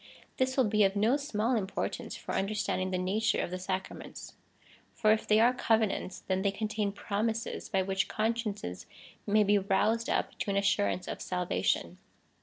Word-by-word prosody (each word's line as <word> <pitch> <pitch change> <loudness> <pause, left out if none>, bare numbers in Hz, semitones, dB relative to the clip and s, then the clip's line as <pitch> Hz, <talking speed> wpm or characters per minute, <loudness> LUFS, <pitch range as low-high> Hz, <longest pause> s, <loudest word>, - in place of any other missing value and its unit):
This 260 +1 0
will 260 - +5
be 215 -1 +3
of 195 0 +2
no 220 +6 +3
small 250 -4 0
im 205 -4 0
portance - - -4
for - - -6
understanding 195 -2 -1
the 185 - -1
nature 200 +5 +1
of - - -2
the 185 - -3
sacraments; 185 +1 -5 0.6
for 215 -2 +3
if 215 0 +1
they 215 0 +5
are 240 +2 +5
covenants, 220 -6 0
then 190 0 -1
they 200 - +2
contain 210 0 -2
promises, 220 +3 -2
by 190 -2 +1
which 190 0 0
consciences 215 - -2 0.4
may 210 +1 +4
be 205 0 +4
I'oused 215 +4 +1
up - - -1
to - - -2
an 200 - +1
assurance 200 -2 +1
of - - -5
salvation. 180 -1 -1
210 Hz, 175 wpm, -30 LUFS, 190-220 Hz, 0.6 s, will